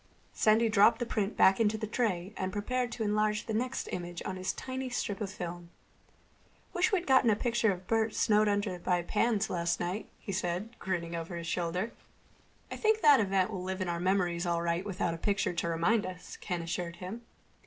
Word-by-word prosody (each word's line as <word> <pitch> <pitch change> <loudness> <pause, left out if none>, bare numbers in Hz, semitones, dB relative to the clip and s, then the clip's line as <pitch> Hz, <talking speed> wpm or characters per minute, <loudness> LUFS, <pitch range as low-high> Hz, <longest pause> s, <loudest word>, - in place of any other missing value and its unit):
Sandy 220 +2 +4
dropped 215 +1 +5
the 240 - -2
print 210 -3 -2
back 190 +2 +5
into 220 -1 +2
the 215 - -3
tray 210 -4 -1
and 185 0 -2
prepared 245 +4 -1
to 230 - -3
enlarge 210 0 +1
the 220 - -3
next 250 +4 -2
image 175 -1 -5
on 185 - -3
his 185 0 -2
tiny 260 0 -5
strip 205 -4 -3
of 205 - -2
film. 175 -2 -6 1.0
"Wish 360 0 +2
we'd 365 -3 +1
gotten 260 -3 +5
a 215 - +4
picture 235 -1 +1
of 185 -1 -6
Bert 225 0 +1
snowed 215 0 +3
under 205 -3 0
by 175 0 0
pans 215 +3 +1
last 170 -1 -1
night," 180 +5 -3
he 200 - -7
said, 190 +5 -2
grinning 170 -3 -3
over 170 +1 -5
his 170 - -6
shoulder. 180 +5 -1 0.8
"I - - -4
think 440 0 +2
that 290 -2 +7
event 195 -1 +1
will 190 -3 -4
live 190 +1 -4
in 185 -2 -2
our 170 0 -2
memories 180 -1 +1
all 170 -1 0
right 170 +1 0
without 185 -4 -2
a - - -5
picture 200 -2 0
to 170 0 -2
remind 185 +6 +2
us," 180 -1 -8
Ken 175 -2 -4
assured 170 0 -3
him. 185 +6 -7
195 Hz, 205 wpm, -31 LUFS, 175-220 Hz, 1.0 s, that